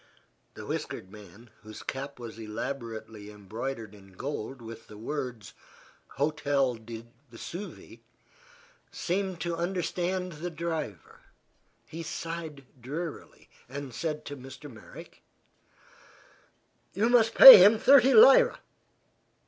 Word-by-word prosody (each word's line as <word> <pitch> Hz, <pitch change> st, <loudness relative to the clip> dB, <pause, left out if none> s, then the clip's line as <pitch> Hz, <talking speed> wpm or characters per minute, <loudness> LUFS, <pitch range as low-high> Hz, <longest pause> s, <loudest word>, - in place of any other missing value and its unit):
The -, -, -9 dB
whiskered 95 Hz, -, -6 dB
man, 105 Hz, +3 st, -15 dB
whose 110 Hz, 0 st, -11 dB
cap 140 Hz, +1 st, -6 dB
was 115 Hz, -2 st, -10 dB
elaborately 110 Hz, -2 st, -7 dB
embroidered 110 Hz, +2 st, -7 dB
in 95 Hz, -2 st, -17 dB
gold 135 Hz, +3 st, -6 dB
with 115 Hz, -1 st, -11 dB
the 105 Hz, -, -13 dB
words 120 Hz, -4 st, -6 dB, 0.6 s
"Hotel 140 Hz, -2 st, 0 dB
du 115 Hz, 0 st, -10 dB, 0.3 s
Vesuve," 175 Hz, -, -10 dB, 0.9 s
seemed 190 Hz, 0 st, -3 dB
to 170 Hz, -1 st, -3 dB
understand 180 Hz, +1 st, -3 dB
the 170 Hz, +3 st, -6 dB
driver. 160 Hz, -, -6 dB, 0.7 s
He 165 Hz, -, -9 dB
sighed 160 Hz, -3 st, -7 dB, 0.2 s
drearily 155 Hz, +6 st, -8 dB, 0.2 s
and 140 Hz, -1 st, -8 dB
said 155 Hz, +2 st, -4 dB
to 145 Hz, -, -7 dB
Mr. 135 Hz, +1 st, -12 dB
Merrick: 110 Hz, -, -14 dB, 1.7 s
"You 205 Hz, +5 st, +1 dB
must 230 Hz, -2 st, +3 dB
pay 265 Hz, -, +13 dB
him 210 Hz, +3 st, +6 dB
thirty 270 Hz, +2 st, +5 dB
lira." -, -, +7 dB
140 Hz, 110 wpm, -28 LUFS, 115-170 Hz, 1.7 s, pay